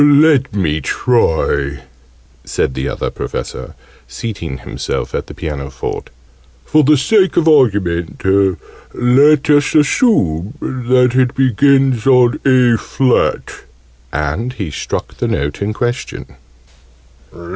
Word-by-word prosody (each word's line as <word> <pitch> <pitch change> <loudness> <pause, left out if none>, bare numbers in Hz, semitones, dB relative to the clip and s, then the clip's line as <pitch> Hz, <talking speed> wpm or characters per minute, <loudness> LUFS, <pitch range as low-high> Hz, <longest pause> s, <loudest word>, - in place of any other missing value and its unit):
"Let 145 -2 +4
me 80 -7 -1
try," 70 - 0 0.6
said 65 - -2
the 65 +2 -3
Other - - -4
Professor, - - -6 0.3
seating 85 - -6
himself - - -5
at - - -4
the - - -11
pianoforte. 70 -4 -6 0.6
"For 155 0 +3
the 150 +2 +4
sake 190 +7 +2
of 165 -1 +2
argument, 100 - +2 0.8
let 140 +4 +3
us 145 +1 +2
assume 135 - +1
that 125 -1 +1
it 130 -1 +1
begins 135 -1 +2
on 125 +1 +4
A 125 -3 +4
flat." 130 -2 -1 0.5
And 75 - -3
he 100 - -5
struck - - -5
the - - -2
note 75 +5 -3
in 100 +1 -1
question. 120 +3 -4
125 Hz, 115 wpm, -15 LUFS, 85-135 Hz, 0.8 s, Let